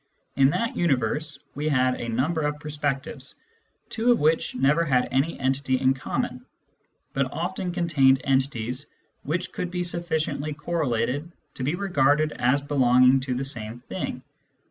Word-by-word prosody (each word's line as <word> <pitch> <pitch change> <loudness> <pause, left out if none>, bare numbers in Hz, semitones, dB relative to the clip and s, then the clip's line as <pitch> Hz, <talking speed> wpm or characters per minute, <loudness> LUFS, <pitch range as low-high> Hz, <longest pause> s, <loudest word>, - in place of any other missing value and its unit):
In 135 -1 +5
that 230 +10 -1
universe, 150 -1 0 0.2
we 150 +2 -2
had 130 -3 +3
a 120 - -4
number 145 +8 0
of 150 0 -1
perspectives, 145 -2 -3 0.5
two 235 +2 +2
of 240 - +4
which 155 -1 +1
never 140 +6 +3
had 130 -5 +2
any 135 +6 0
entity 130 0 0
in 130 0 +3
common, 130 - -3 0.7
but 135 -1 0
often 180 +4 -3
contained 155 -7 +3
entities 130 -1 0 0.3
which 170 +5 -2
could 180 - -3
be 180 0 -2
sufficiently 160 -4 -1
correlated 145 -1 -1 0.2
to 130 - -6
be 150 +6 0
regarded 155 -5 +2
as 130 +2 +1
belonging 130 -2 +4
to 130 -1 -3
the 135 +2 -2
same 120 -3 -3
thing. - - -5
140 Hz, 145 wpm, -25 LUFS, 130-160 Hz, 0.7 s, In